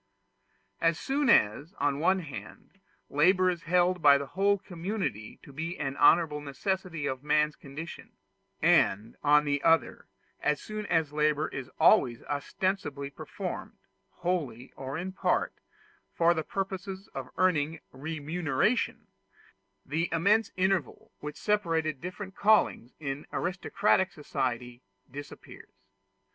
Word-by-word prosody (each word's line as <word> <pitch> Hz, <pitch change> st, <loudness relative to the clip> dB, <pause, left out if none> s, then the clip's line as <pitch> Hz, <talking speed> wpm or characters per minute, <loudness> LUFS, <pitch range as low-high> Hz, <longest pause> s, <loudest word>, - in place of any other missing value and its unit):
As 165 Hz, -1 st, +2 dB
soon 275 Hz, 0 st, 0 dB
as, 145 Hz, -, +3 dB
on 145 Hz, -4 st, +1 dB
the 140 Hz, -, -5 dB
one 185 Hz, +4 st, +3 dB
hand, 165 Hz, +5 st, -10 dB, 0.3 s
labor 185 Hz, +5 st, +4 dB
is 175 Hz, -2 st, -5 dB
held 180 Hz, +1 st, +2 dB
by 145 Hz, -2 st, +7 dB
the 140 Hz, -, -4 dB
whole 200 Hz, +7 st, +2 dB
community 175 Hz, -, -4 dB
to 140 Hz, -, -13 dB
be 165 Hz, +5 st, -4 dB
an 135 Hz, -2 st, -3 dB
honorable 155 Hz, -3 st, +4 dB
necessity 165 Hz, +2 st, -3 dB
of 130 Hz, -1 st, -3 dB
man's 150 Hz, 0 st, +2 dB
condition, 150 Hz, +4 st, -9 dB, 0.5 s
and, 105 Hz, +4 st, +3 dB
on 150 Hz, 0 st, +5 dB
the 145 Hz, -1 st, 0 dB
other, 165 Hz, 0 st, +2 dB, 0.3 s
as 150 Hz, -1 st, +1 dB
soon 215 Hz, -1 st, -6 dB
as 160 Hz, -4 st, +1 dB
labor 150 Hz, 0 st, +1 dB
is 130 Hz, -3 st, -6 dB
always 155 Hz, -, +4 dB
ostensibly 145 Hz, -2 st, -2 dB
performed, -, -, -6 dB, 0.3 s
wholly 150 Hz, -9 st, -3 dB
or 135 Hz, +2 st, -5 dB
in 185 Hz, +3 st, -4 dB
part, 185 Hz, -, 0 dB, 0.6 s
for 170 Hz, 0 st, +4 dB
the 160 Hz, -, -1 dB
purpose 195 Hz, +1 st, -4 dB, 0.3 s
of 135 Hz, -2 st, -6 dB
earning 165 Hz, -4 st, +2 dB
remuneration, 160 Hz, -, -1 dB, 0.8 s
the 160 Hz, +5 st, -1 dB
immense 200 Hz, +7 st, +3 dB
interval 190 Hz, -2 st, 0 dB
which 150 Hz, 0 st, -7 dB
separated 165 Hz, -8 st, 0 dB
different 190 Hz, +2 st, -7 dB
callings 205 Hz, -, +2 dB
in 140 Hz, -1 st, -5 dB
aristocratic 190 Hz, +1 st, +1 dB
societies 125 Hz, -4 st, -3 dB, 0.3 s
disappears. 145 Hz, +2 st, -10 dB
160 Hz, 125 wpm, -29 LUFS, 145-185 Hz, 0.8 s, by